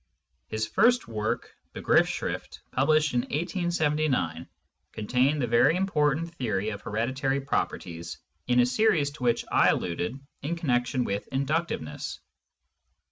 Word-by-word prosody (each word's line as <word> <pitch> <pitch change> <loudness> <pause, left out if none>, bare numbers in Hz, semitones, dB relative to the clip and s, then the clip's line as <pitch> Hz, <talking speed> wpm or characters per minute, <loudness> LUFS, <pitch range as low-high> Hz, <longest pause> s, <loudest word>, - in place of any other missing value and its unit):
His 110 0 -2
first 235 - +3
work, 110 -1 -3 0.2
Begriffsschrifl^ - - 0
published 150 +2 +2
in 120 - +3
1 135 - -11
879, 155 - 0 0.5
contained 130 +7 +1
the 130 - +1
very 120 +7 +4
important 165 -3 +1
theory 110 - -1
of 100 -1 -6
hereditary 130 +5 -1
properties 85 -10 -3 0.3
in 125 0 +3
a - - +4
series 150 - +2
to 145 -3 -10
which 120 -1 +1
I - - +5
alluded 90 +9 -1 0.2
in 155 +5 -2
connection 130 -5 0
with 100 -2 -3
inductiveness. 140 - -2
135 Hz, 125 wpm, -27 LUFS, 110-155 Hz, 0.5 s, I